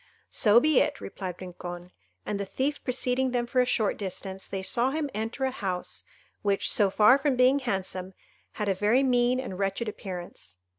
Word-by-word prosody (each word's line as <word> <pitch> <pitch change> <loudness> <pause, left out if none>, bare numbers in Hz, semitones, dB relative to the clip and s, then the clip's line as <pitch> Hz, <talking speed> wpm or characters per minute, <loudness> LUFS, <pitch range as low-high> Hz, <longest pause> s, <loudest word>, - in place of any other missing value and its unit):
"So 215 +1 +5
be 305 +1 +4
it," 290 - 0
replied 185 -3 -6
Rincon; 175 -1 -8 0.3
and 205 -1 -2
the 200 - -2
thief 280 +7 -2
preceding 255 0 +1
them 245 -1 0
for 250 +1 +2
a 250 - +1
short 220 -4 +1
distance, 190 -1 -5
they 195 -1 -4
saw 240 +6 +2
him 295 0 -2
enter 225 +5 -3
a 265 - +1
house 185 -7 -4 0.4
which, 200 -1 +1
so 205 -2 +4
far 215 +7 +5
from 275 -1 +1
being 255 +3 +4
handsome, 190 -6 -4 0.4
had 210 - -3
a 195 - +3
very 210 +7 +2
mean 250 -1 +2
and 195 -8 -6
wretched 195 +4 -1
appearance. 175 - -7
215 Hz, 185 wpm, -27 LUFS, 190-255 Hz, 0.4 s, So